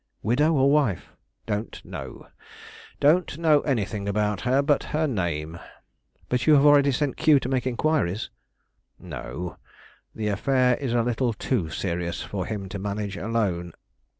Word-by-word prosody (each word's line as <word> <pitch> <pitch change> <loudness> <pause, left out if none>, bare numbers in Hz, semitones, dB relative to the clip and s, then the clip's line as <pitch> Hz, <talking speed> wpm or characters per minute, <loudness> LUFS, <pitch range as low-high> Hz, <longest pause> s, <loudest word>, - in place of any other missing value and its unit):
"Widow 150 +8 +2
or 140 -1 +4
wife?" 140 - +1 0.4
"Don't 105 +1 -3
know; - - -8 0.7
don't 155 +1 +3
know 155 -3 +4
anything 105 -6 -2
about 105 -1 0
her 130 +3 +2
but 145 -1 +1
her 155 +1 0
name." 85 - -2 0.7
"But 125 +3 -1
you 155 - +7
have 140 0 +5
already 145 -1 +6
sent 140 +1 -1
Q 150 -3 +5
to 130 - -5
make 130 -1 -1
inquiries?" 120 - 0 0.7
"No; 85 +8 -7 0.6
the 105 -1 -2
affair 125 +4 +2
is 130 -4 -3
a 120 -1 +2
little 120 0 0
too 105 -7 -1
serious 85 -1 -3
for 95 -2 -4
him 105 -3 -4
to 100 - -5
manage 100 0 -3
alone. 95 -5 -2
115 Hz, 150 wpm, -25 LUFS, 100-140 Hz, 0.7 s, you